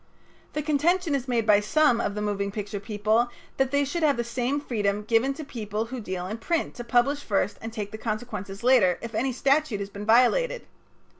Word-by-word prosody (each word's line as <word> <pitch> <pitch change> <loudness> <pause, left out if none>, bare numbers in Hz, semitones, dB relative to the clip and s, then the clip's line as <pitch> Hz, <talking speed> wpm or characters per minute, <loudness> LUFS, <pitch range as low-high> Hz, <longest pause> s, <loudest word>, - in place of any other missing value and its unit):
The 300 - -2
contention 320 +3 +1
is 275 -2 -1
made 235 -3 +1
by 210 -2 +6
some 240 +2 +3
of 200 - -2
the 210 - -2
moving 200 -1 -1
picture 205 0 -4
people 215 +3 +1 0.3
that 270 -1 +2
they 285 +1 +2
should 335 +5 -3
have 295 -4 +3
the 240 - 0
same 245 +4 -1
freedom 210 -7 -1
given 230 +5 +2
to 310 - -6
people 220 -5 -4
who 255 - -3
deal 185 -3 -4
in 215 +5 -5
print 335 +7 -1
to 240 - -5
publish 245 +4 +2
first 205 -1 -1
and 225 - -6
take 210 -3 -5
the 220 - -7
consequences 215 -3 -5
later 235 -9 +5
if 230 -1 -6
any 260 +5 0
statute 275 -2 +1
has 200 0 -5
been 205 +1 -7
violated. 475 - +3
235 Hz, 210 wpm, -26 LUFS, 210-275 Hz, 0.3 s, by